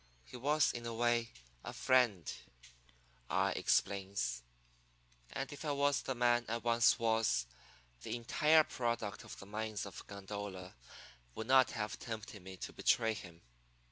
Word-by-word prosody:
He -, -, -13 dB
was 145 Hz, +5 st, +2 dB
in 120 Hz, -1 st, -5 dB
a 115 Hz, -, -4 dB
way 120 Hz, 0 st, +2 dB, 0.3 s
a -, -, -6 dB
friend,' 120 Hz, -, +2 dB, 1.0 s
I -, -, +2 dB
explains, 95 Hz, -11 st, 0 dB, 0.9 s
'and 135 Hz, +1 st, -4 dB
if 145 Hz, -, -9 dB
I 150 Hz, -2 st, 0 dB
was 140 Hz, 0 st, +2 dB
the 130 Hz, -, -3 dB
man 120 Hz, 0 st, +3 dB
I 115 Hz, -, 0 dB
once 115 Hz, 0 st, +4 dB
was 115 Hz, -, +2 dB, 0.6 s
the -, -, -3 dB
entire 150 Hz, +7 st, +4 dB
product 115 Hz, -6 st, -2 dB
of -, -, -10 dB
the -, -, -10 dB
mines 105 Hz, +1 st, -3 dB
of 100 Hz, -, -9 dB
Gondola 100 Hz, -2 st, -6 dB, 0.6 s
would 110 Hz, -, -4 dB
not 130 Hz, 0 st, +6 dB
have 105 Hz, -2 st, -3 dB
tempted 110 Hz, -3 st, -6 dB
me 95 Hz, +1 st, -9 dB
to -, -, -6 dB
betray 115 Hz, -2 st, +2 dB
him. 85 Hz, -5 st, -10 dB
115 Hz, 145 wpm, -35 LUFS, 100-120 Hz, 1.0 s, not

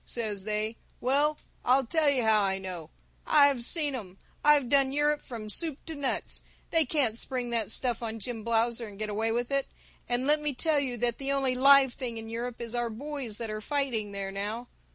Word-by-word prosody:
says 210 Hz, -5 st, -3 dB
they. 215 Hz, +1 st, -1 dB, 0.2 s
Well 290 Hz, +4 st, +2 dB, 0.3 s
I'll 260 Hz, +2 st, +3 dB
tell 310 Hz, +3 st, +2 dB
you 265 Hz, -4 st, +1 dB
how 220 Hz, -1 st, +4 dB
I 190 Hz, -1 st, +1 dB
know! 180 Hz, -4 st, -6 dB, 0.4 s
I've 285 Hz, -5 st, +5 dB
seen 295 Hz, +2 st, +4 dB
'em! 195 Hz, -7 st, -7 dB, 0.3 s
I've 295 Hz, -3 st, +5 dB
done 275 Hz, +1 st, +3 dB
Europe 295 Hz, +1 st, +1 dB
from 225 Hz, -4 st, -8 dB
soup 305 Hz, +6 st, 0 dB
to 325 Hz, -, -5 dB
nuts! 285 Hz, -3 st, -3 dB, 0.3 s
They 325 Hz, -2 st, +3 dB
can't 250 Hz, -5 st, +1 dB
spring 250 Hz, -2 st, -3 dB
that 230 Hz, -3 st, +1 dB
stuff 245 Hz, +1 st, -1 dB
on 225 Hz, -1 st, -4 dB
Jim 225 Hz, 0 st, -5 dB
Blausser 230 Hz, +1 st, +1 dB
and 200 Hz, -1 st, -11 dB
get 215 Hz, 0 st, -3 dB
away 220 Hz, +2 st, 0 dB
with 240 Hz, +3 st, -1 dB
it! 275 Hz, -1 st, 0 dB, 0.4 s
And 245 Hz, +1 st, +1 dB
let 300 Hz, +1 st, +3 dB
me 295 Hz, -2 st, -2 dB
tell 310 Hz, +2 st, +1 dB
you 255 Hz, -3 st, -2 dB
that 240 Hz, 0 st, 0 dB
the 275 Hz, 0 st, -2 dB
only 270 Hz, -2 st, +1 dB
live 270 Hz, 0 st, +6 dB
thing 240 Hz, -4 st, -5 dB
in 225 Hz, 0 st, -7 dB
Europe 235 Hz, +1 st, -4 dB
is 235 Hz, -1 st, -4 dB
our 240 Hz, -1 st, -1 dB
boys 260 Hz, -1 st, -5 dB
that 225 Hz, -2 st, -4 dB
are 215 Hz, 0 st, -4 dB
fighting 245 Hz, -6 st, -1 dB
there 195 Hz, -1 st, -4 dB
now! 210 Hz, +5 st, -4 dB
245 Hz, 210 wpm, -29 LUFS, 220-275 Hz, 0.4 s, live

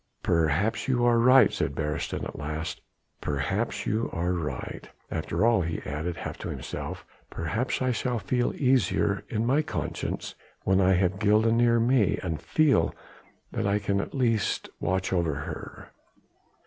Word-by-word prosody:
perhaps 85 Hz, +6 st, +1 dB
you 120 Hz, -2 st, +2 dB
are 120 Hz, -1 st, +4 dB
right," 125 Hz, +3 st, +6 dB
said 70 Hz, -, -1 dB
Beresteyn 75 Hz, 0 st, -2 dB
at -, -, -5 dB
last, 80 Hz, +3 st, -4 dB, 0.4 s
"perhaps 70 Hz, -3 st, -1 dB
you 110 Hz, +2 st, 0 dB
are 90 Hz, +2 st, -1 dB
right. 85 Hz, -4 st, -5 dB, 0.2 s
After 110 Hz, -, 0 dB
all," 115 Hz, -5 st, +4 dB
he 80 Hz, -1 st, -2 dB
added 80 Hz, +4 st, -3 dB
half -, -, -6 dB
to -, -, -5 dB
himself, -, -, -6 dB, 0.2 s
"perhaps 110 Hz, +11 st, -2 dB
I 130 Hz, -, +2 dB
shall 125 Hz, 0 st, -1 dB
feel 120 Hz, +3 st, 0 dB
easier 120 Hz, -6 st, +2 dB
in 110 Hz, 0 st, -1 dB
my 135 Hz, +5 st, +3 dB
conscience 155 Hz, 0 st, -4 dB, 0.3 s
when 95 Hz, 0 st, +3 dB
I 95 Hz, 0 st, +4 dB
have 95 Hz, +1 st, +1 dB
Gilda 110 Hz, +2 st, +4 dB
near 115 Hz, 0 st, +4 dB
me 115 Hz, -3 st, +3 dB
and 80 Hz, -3 st, -3 dB
feel 145 Hz, -, +2 dB, 0.6 s
that -, -, -1 dB
I 100 Hz, +1 st, +2 dB
can 100 Hz, -1 st, 0 dB
at -, -, -7 dB
least 115 Hz, -6 st, 0 dB
watch 95 Hz, +1 st, -1 dB
over 85 Hz, -5 st, +1 dB
her." 70 Hz, -, -7 dB
100 Hz, 155 wpm, -27 LUFS, 85-120 Hz, 0.6 s, right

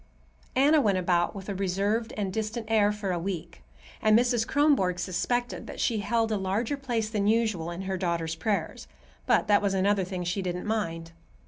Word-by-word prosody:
Anna 290 Hz, +4 st, +5 dB
went 205 Hz, -6 st, +2 dB
about 175 Hz, -1 st, +1 dB
with 195 Hz, -1 st, -8 dB
a 200 Hz, -, -2 dB
reserved 200 Hz, +4 st, -1 dB
and 195 Hz, -3 st, -2 dB
distant 220 Hz, +2 st, -3 dB
air 210 Hz, -2 st, +4 dB
for 210 Hz, -2 st, -3 dB
a 175 Hz, -, -1 dB
week, 175 Hz, -2 st, -5 dB, 0.4 s
and 215 Hz, 0 st, +5 dB
Mrs. 240 Hz, -1 st, +2 dB
Kronborg 275 Hz, -12 st, +2 dB
suspected 240 Hz, +8 st, -2 dB
that -, -, -8 dB
she 225 Hz, -3 st, +1 dB
held 225 Hz, +2 st, 0 dB
a 215 Hz, -, +1 dB
larger 200 Hz, +8 st, -1 dB
place 240 Hz, -6 st, -2 dB
than 210 Hz, -2 st, -1 dB
usual 215 Hz, -7 st, +1 dB
in 175 Hz, +2 st, -5 dB
her 190 Hz, 0 st, -2 dB
daughter's 170 Hz, -3 st, -1 dB
prayers; 200 Hz, +5 st, -2 dB, 0.4 s
but -, -, +3 dB
that 205 Hz, -1 st, +4 dB
was 200 Hz, -1 st, 0 dB
another 195 Hz, +1 st, +2 dB
thing 180 Hz, -1 st, -4 dB
she 175 Hz, +3 st, -1 dB
didn't 180 Hz, -1 st, -3 dB
mind. 165 Hz, -7 st, -2 dB
205 Hz, 190 wpm, -27 LUFS, 185-225 Hz, 0.4 s, Anna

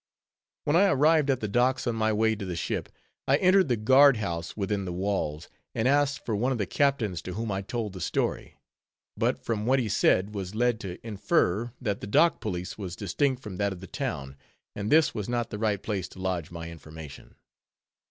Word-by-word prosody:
When 145 Hz, -, +1 dB
I 200 Hz, +4 st, +6 dB
arrived 150 Hz, -2 st, +4 dB
at 130 Hz, -2 st, +1 dB
the 105 Hz, -, -1 dB
docks 125 Hz, +5 st, +1 dB
on 120 Hz, -, 0 dB
my 110 Hz, -1 st, +1 dB
way 110 Hz, +1 st, +2 dB
to 105 Hz, -, -6 dB
the 90 Hz, -2 st, -4 dB
ship, 85 Hz, -, -3 dB, 0.4 s
I 135 Hz, -, +5 dB
entered 185 Hz, +1 st, +4 dB
the 120 Hz, -3 st, +1 dB
guard 130 Hz, +4 st, +6 dB
house 85 Hz, -5 st, -4 dB
within 100 Hz, -1 st, -1 dB
the 90 Hz, -, -4 dB
walls, 90 Hz, -5 st, -2 dB, 0.3 s
and 110 Hz, -, +1 dB
asked 145 Hz, +1 st, +2 dB
for 110 Hz, -, -1 dB
one 125 Hz, +6 st, +1 dB
of 130 Hz, -, 0 dB
the 105 Hz, -, -1 dB
captains, 115 Hz, -, 0 dB
to 90 Hz, -, -6 dB
whom 110 Hz, +1 st, -3 dB
I 95 Hz, 0 st, -1 dB
told 105 Hz, 0 st, -4 dB
the 95 Hz, -, -8 dB
story; -, -, -2 dB, 0.6 s
but, -, -, -1 dB
from 110 Hz, -1 st, -1 dB
what 130 Hz, +1 st, +4 dB
he 125 Hz, -4 st, 0 dB
said, 100 Hz, 0 st, +2 dB
was 100 Hz, -1 st, -5 dB
led 120 Hz, 0 st, +1 dB
to 90 Hz, -5 st, -6 dB
infer 110 Hz, -, +1 dB
that 105 Hz, -6 st, -2 dB
the -, -, -5 dB
Dock 165 Hz, +11 st, +3 dB
Police 90 Hz, +3 st, -4 dB
was 90 Hz, -3 st, -5 dB
distinct 130 Hz, -, -1 dB
from 100 Hz, -4 st, -7 dB
that 100 Hz, 0 st, 0 dB
of 90 Hz, -, -10 dB
the 95 Hz, -, -9 dB
town, 70 Hz, -5 st, -4 dB, 0.4 s
and 105 Hz, +1 st, -3 dB
this 160 Hz, +1 st, +5 dB
was 105 Hz, -2 st, -4 dB
not 120 Hz, -1 st, -1 dB
the 105 Hz, -, -5 dB
right 105 Hz, -3 st, 0 dB
place 100 Hz, -5 st, -2 dB
to 95 Hz, -, -14 dB
lodge 90 Hz, -4 st, -2 dB
my 85 Hz, -1 st, -7 dB
information. 80 Hz, -2 st, -11 dB
105 Hz, 210 wpm, -27 LUFS, 95-125 Hz, 0.6 s, I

